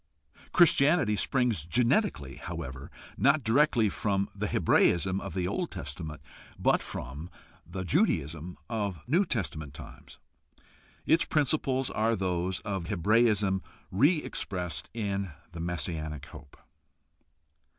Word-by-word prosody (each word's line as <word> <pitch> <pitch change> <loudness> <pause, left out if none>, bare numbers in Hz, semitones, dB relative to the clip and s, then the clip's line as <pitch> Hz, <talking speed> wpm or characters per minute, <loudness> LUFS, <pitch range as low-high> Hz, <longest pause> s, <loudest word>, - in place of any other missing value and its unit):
Christianity 150 -7 +5
springs 120 - +1
genetically, 115 - +1
however, 65 +1 -6 0.3
not 140 +1 +3
directly 120 -1 +3
from 100 -1 -1
the - - -3
Hebraism 95 +2 +3
of 95 - -6
the 90 -2 0
Old 170 - -2
Testament, 75 -4 -6 0.4
but - - +3
from 70 +7 -7 0.4
the 95 +2 -5
Judaism 85 - 0
of 100 -7 -3
New 175 +10 +3
Testament 80 - -3
times. - - -12 0.9
Its 165 - +4
principles 135 -3 +1
are 115 +2 +1
those 90 -1 -1
of 95 -5 -4
Hebraism 105 0 +2 0.3
re 145 - +4
expressed 90 -7 -3
in 100 -3 -2 0.2
the 85 - -8
messianic 80 -3 -3
hope. 70 - -13
100 Hz, 110 wpm, -29 LUFS, 85-125 Hz, 0.9 s, Christianity